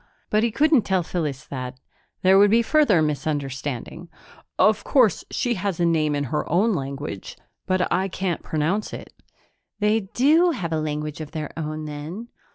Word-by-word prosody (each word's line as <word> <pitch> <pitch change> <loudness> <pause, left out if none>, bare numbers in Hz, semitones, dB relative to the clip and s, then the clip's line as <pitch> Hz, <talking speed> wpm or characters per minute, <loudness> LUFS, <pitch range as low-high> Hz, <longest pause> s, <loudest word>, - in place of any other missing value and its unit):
But 215 - +3
he 235 - +2
couldn't 295 +3 +3
tell 190 -3 0
Phyllis 150 -6 -3
that; 130 -1 -6 0.4
there 190 +1 +6
would 205 0 +6
be 230 +3 +4
further 230 - +4
misunderstanding. 145 -4 -3 0.5
"Of 215 0 +3
course 245 -7 +3
she 245 -2 0
has 195 -4 -3
a 175 - +3
name 155 -3 +2
in 145 - -1
her 150 - -1
own 205 +7 +3
language, 140 - -5 0.3
but 185 -1 +1
I 190 +1 +1
can't 185 -2 -3
pronounce 165 +7 -1
it." - - -9 0.6
"They 210 -1 +1
do 320 +7 +4
have 170 -8 -3
a 155 - 0
language 150 0 -4
of 155 - -8
their 155 -2 -5
own 155 -1 -4
then?" 155 +10 -7
170 Hz, 165 wpm, -23 LUFS, 150-215 Hz, 0.6 s, there